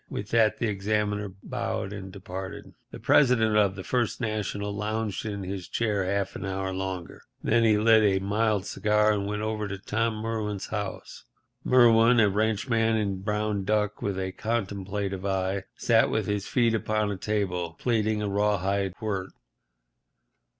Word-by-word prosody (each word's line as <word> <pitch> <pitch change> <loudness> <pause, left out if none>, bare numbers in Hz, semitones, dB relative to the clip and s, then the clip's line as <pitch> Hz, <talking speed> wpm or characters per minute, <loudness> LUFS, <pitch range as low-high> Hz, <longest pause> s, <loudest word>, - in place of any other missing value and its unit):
With 100 - -5
that 115 -2 +3
the - - -1
examiner 105 0 -1
bowed 100 +1 -3
and 95 -2 -7
departed. 95 -1 -7 0.2
The - - -9
President 115 -6 +4
of 100 -2 +3
the 95 - -7
First 120 0 -1
National 105 -2 -2
lounged 110 +1 -2
in 100 -2 -4
his 95 -1 -5
chair 105 -4 0
half 100 +1 -1
an - - -6
hour 95 0 -2
longer, 95 -2 -5 0.2
and - - -2
then 115 +1 +4
he 110 -2 +4
lit 110 +1 +5
a 100 -2 +3
mild 105 0 0
cigar, 105 0 +2
and 100 -1 -2
went 105 +1 -3
over 110 -1 -2
to 100 0 -5
Tom 110 +3 -1
Merwin's 110 -2 -3
house. 105 -3 -6 0.4
Merwin, 120 -1 +6
a 105 -2 +5
ranchman 110 +2 +1
in 100 -3 -1
brown 105 0 -1
duck, 105 +1 0
with 100 -2 -2
a 95 0 -2
contemplative 100 -2 -3
eye, 95 0 -1
sat - - +3
with - - 0
his 105 -1 -2
feet 120 -3 +2
upon 110 -1 0
a - - -2
table, 95 -5 -2
plaiting 110 -3 +1
a - - -1
rawhide 100 -1 0
quirt. 100 -5 -4
105 Hz, 165 wpm, -27 LUFS, 95-110 Hz, 0.4 s, Merwin